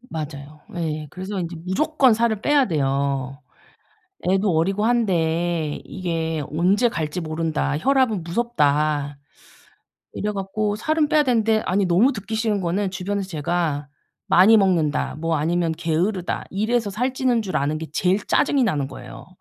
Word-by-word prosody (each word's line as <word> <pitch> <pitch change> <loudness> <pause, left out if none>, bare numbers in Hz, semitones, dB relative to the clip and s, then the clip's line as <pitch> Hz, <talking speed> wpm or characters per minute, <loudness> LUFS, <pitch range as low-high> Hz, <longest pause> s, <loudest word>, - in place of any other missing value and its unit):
맞아요. 150 - -8 0.2
예. 155 -2 -3
그래서 190 +2 -5
인제 170 0 -5
무조건 265 +4 +3
살을 225 -2 0
빼야 290 -2 +3
돼요. 140 -3 -1 0.9
애도 195 +1 +2
어리고 195 +6 +1
한데 170 -8 0
이게 165 -4 -3
'언제 190 +9 +2
갈지 165 -2 -3
모른다. 155 -2 -1
혈압은 255 - +2
무섭다.' 150 -8 0 1.0
이래 210 0 -2
갖고 205 +2 -2
살은 310 +5 +1
빼야 305 0 +4
되는데 225 -5 +2
아니 195 +2 +1
너무 195 +11 +4
듣기 220 0 -6
싫은 220 -2 0
거는 185 +3 -1
주변에서 195 +1 -3
제가 155 -3 -2 0.4
'많이 205 +5 +6
먹는다.' 170 -8 +1
뭐 165 +1 -1
아니면 165 +2 0
'게으르다.' 170 +3 -1
이래서 215 +2 0
살찌는 250 +1 0
줄 190 -3 -3
아는 150 +2 0
게 160 - -6
제일 185 +4 +2
짜증이 280 -2 +2
나는 145 - 0
거예요. 130 -2 -11
180 Hz, 310 characters per minute, -22 LUFS, 155-220 Hz, 1.0 s, 많이